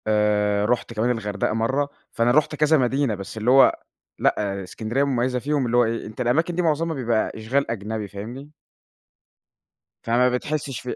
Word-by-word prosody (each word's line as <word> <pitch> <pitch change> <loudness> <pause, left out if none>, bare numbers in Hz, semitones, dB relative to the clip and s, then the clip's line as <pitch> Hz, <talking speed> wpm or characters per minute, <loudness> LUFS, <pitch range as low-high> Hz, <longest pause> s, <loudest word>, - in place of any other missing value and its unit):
آآ، 105 -1 +2
رُحت 120 +1 -1
كمان 115 +2 0
الغردقة 105 -4 -2
مرَّة، 130 +6 0 0.2
فأنا 115 +1 +2
رُحت 155 +2 +2
كذا 155 +1 +3
مدينة 130 -2 +1
بس 100 +3 -8
اللي 110 +3 +1
هو 135 +1 +6 0.4
لأ، 100 -1 0
إسكندرية 115 +8 -2
مميَّزة 125 -2 0
فيهم، 145 +1 0
اللي 120 0 +1
هو 120 - +6
إيه، 115 0 -3
أنت 110 +4 -7
الأماكن 160 +8 +1
دي 180 - +1
مُعظَمها 165 0 0
بيبقى 115 -4 0
إشغال 120 +4 -1
أجنبي، 110 -1 -4
فاهمني؟ 120 +9 -8 1.5
فما 120 +2 +3
بتحسّش 135 0 -3
في 125 - -5
120 Hz, 165 wpm, -23 LUFS, 110-140 Hz, 1.5 s, هو